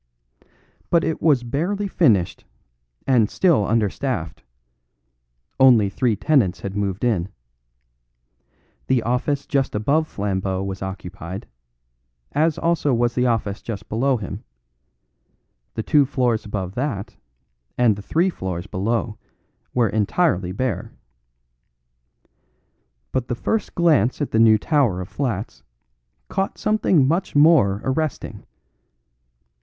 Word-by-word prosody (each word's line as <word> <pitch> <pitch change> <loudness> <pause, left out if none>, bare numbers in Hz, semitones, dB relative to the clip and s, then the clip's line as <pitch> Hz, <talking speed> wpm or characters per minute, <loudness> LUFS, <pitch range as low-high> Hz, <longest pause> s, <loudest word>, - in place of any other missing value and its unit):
But 170 -1 +3
it 160 - -2
was 145 -6 +3
barely 175 +12 -2
finished 100 - +2 0.6
and 120 -6 +3
still 160 - +2
understaffed; 110 - -1 1.2
only 120 -6 +6
three 120 0 +1
tenants 105 - +1
had 100 0 -5
moved 100 0 -2
in; 100 -7 0 1.6
the 125 -3 +2
office 135 +4 -1
just 140 -7 -1
above 145 +9 +1
Flambeau 95 -3 -2
was 95 0 -5
occupied, 95 -1 -7 0.9
as 155 +1 +1
also 165 -5 +1
was 120 0 +1
the 125 0 +1
office 105 -4 -1
just 105 -3 -7
below 130 +4 +1
him; 105 - -7 1.3
the 110 - -2
two 145 0 +3
floors 125 -5 0
above 95 -3 -4
that 120 -4 -3 0.6
and 120 -4 +4
the 100 - -8
three 170 - +1
floors 95 - -5
below 105 +2 -2 0.5
were 120 -2 +2
entirely 100 - +1
bare. 125 +5 -3 2.2
But 130 -2 -2
the 120 - -2
first 220 - -2
glance 155 - +3
at 145 - -2
the 110 - +2
new 110 -1 +6
tower 125 - +1
of 90 +1 -6
flats 110 -2 -4 0.7
caught 195 0 -2
something 190 -9 +2
much 170 +3 -1
more 145 -10 +5
arresting. 145 +2 -3
120 Hz, 115 wpm, -22 LUFS, 100-145 Hz, 2.2 s, only